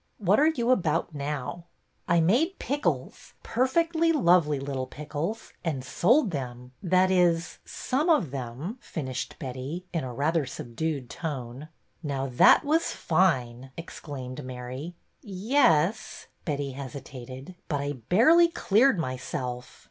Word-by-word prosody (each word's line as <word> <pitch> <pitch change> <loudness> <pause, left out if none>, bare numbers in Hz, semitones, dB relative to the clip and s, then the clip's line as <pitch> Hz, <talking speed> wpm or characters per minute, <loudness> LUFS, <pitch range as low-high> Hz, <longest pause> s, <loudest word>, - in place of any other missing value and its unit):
'' - - -45
What 200 0 +3
are 300 - +5
you 250 -6 +1
about 170 -7 +1
now? 145 +3 -4 0.2
" - - -44
I 170 -1 +4
made 260 - +2
pickles, 285 +3 -3
perfectly 330 +7 +2
lovely 170 - +3
little 135 -2 -3
pickles, 155 +9 -5
and 150 -7 -2
sold 230 - +3
them, 125 -4 -6
— - - -41
that 185 0 +3
is, 175 -2 +2
some 295 +7 -1
of 205 - +3
them," 135 - -5
finished 130 -5 -5
Betty, 135 +5 -6
in 165 - -1
a 130 - -5
rather 150 +6 +1
subdued 135 +3 -4
tone. 135 -1 -6 0.3
Now 140 -4 -2
that 130 - +5
was 320 +3 +2
fine! 130 -8 +1
" - - -38
exclaimed 140 -5 -7
Mary. 130 +6 -7
'' - - -45
Ye 205 +6 -5
es," 170 - +3 0.2
Betty 145 -3 -2
hesitated. 130 +2 -8
But 145 -3 -1
I 145 0 -2
barely 230 - +5
cleared 245 - +3
myself." 125 -3 -4
155 Hz, 140 wpm, -27 LUFS, 130-200 Hz, 0.3 s, are